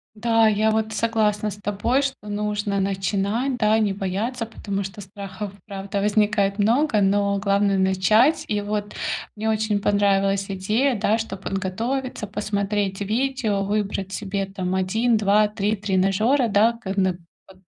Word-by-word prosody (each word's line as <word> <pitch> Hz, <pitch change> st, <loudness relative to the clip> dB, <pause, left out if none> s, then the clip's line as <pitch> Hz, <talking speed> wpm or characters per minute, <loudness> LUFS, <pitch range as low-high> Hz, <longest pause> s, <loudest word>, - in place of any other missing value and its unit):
Да, 225 Hz, +1 st, +3 dB
я 215 Hz, 0 st, +3 dB
вот 220 Hz, 0 st, 0 dB
согласна 215 Hz, -2 st, 0 dB
с 200 Hz, -, -8 dB
тобой, 205 Hz, +6 st, 0 dB
что 265 Hz, -6 st, -4 dB
нужно 205 Hz, -1 st, -1 dB
начинать, 200 Hz, +6 st, -1 dB
да, 220 Hz, -1 st, +3 dB
не 210 Hz, -3 st, +1 dB
бояться, 205 Hz, +6 st, -2 dB
потому 200 Hz, -3 st, -4 dB
что 195 Hz, +2 st, -7 dB
страхов, 195 Hz, 0 st, -7 dB
правда, 200 Hz, 0 st, -4 dB
возникает 205 Hz, -1 st, +2 dB
много, 230 Hz, +3 st, +2 dB
но 200 Hz, 0 st, +2 dB
главное 200 Hz, 0 st, +2 dB
начать. 190 Hz, -, +3 dB
И 210 Hz, -1 st, -1 dB
вот 205 Hz, 0 st, -3 dB, 0.4 s
мне 220 Hz, +1 st, -2 dB
очень 215 Hz, -1 st, 0 dB
понравилась 195 Hz, -1 st, +1 dB
идея, 215 Hz, +8 st, +1 dB
да, 215 Hz, +1 st, +2 dB
чтобы 200 Hz, -4 st, -6 dB
подготовиться, 225 Hz, +6 st, -3 dB
посмотреть 200 Hz, -1 st, -2 dB
видео, 220 Hz, -1 st, 0 dB
выбрать 200 Hz, -1 st, -2 dB
себе, 200 Hz, -1 st, -2 dB
там, 190 Hz, -1 st, -4 dB
1, 220 Hz, +6 st, +1 dB
2, 210 Hz, 0 st, +3 dB
3 210 Hz, +1 st, -1 dB
тренажёра, 200 Hz, +6 st, +2 dB
да, 215 Hz, +3 st, +4 dB
ка 210 Hz, -5 st, -6 dB
на 185 Hz, -2 st, +1 dB, 0.3 s
под 190 Hz, -1 st, -17 dB
205 Hz, 145 wpm, -23 LUFS, 195-220 Hz, 0.4 s, да